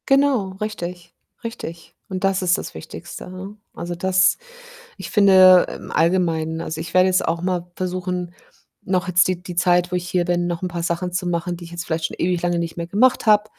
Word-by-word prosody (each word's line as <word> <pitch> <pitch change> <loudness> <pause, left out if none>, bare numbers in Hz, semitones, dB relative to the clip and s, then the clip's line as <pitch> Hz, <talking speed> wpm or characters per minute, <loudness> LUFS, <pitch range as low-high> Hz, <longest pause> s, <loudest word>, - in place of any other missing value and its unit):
Genau, 270 -7 +3
richtig, 180 -4 -5 0.3
richtig. 170 -8 -7
Und 185 -1 -4
das 195 -1 +2
ist 180 -1 +3
das - - -7
Wichtigste, 170 +2 -9
ne? 185 +3 -8 0.2
Also, 175 0 -5
das 190 +2 +3 0.6
ich - - -8
finde 185 -3 +7
im - - -11
Allgemeinen. 165 -1 +1
Also, 160 -1 -4
ich 165 - -7
werde 185 0 +5
jetzt 185 0 +2
auch 165 +1 -1
mal 180 -1 -2
versuchen, 180 -1 -3 0.5
noch 185 0 -1
jetzt 180 0 +4
die 180 -1 -2
die 180 -2 -8
Zeit, 175 0 +3
wo - - +1
ich 180 0 -4
hier 180 -1 +1
bin, 175 0 0
noch 175 0 -3
'n 185 - -1
paar 170 -1 -4
Sachen 175 +1 -2
zu 180 0 -2
machen, 175 0 -2
die 170 - -10
ich 165 - -11
jetzt 170 +1 -5
vielleicht 160 0 -1
schon - - -9
ewig 175 0 0
lange 175 -1 +1
nicht 165 -1 -3
mehr 170 - -3
gemacht 235 +8 +2
habe. 210 -1 +5
180 Hz, 210 wpm, -21 LUFS, 170-185 Hz, 0.6 s, finde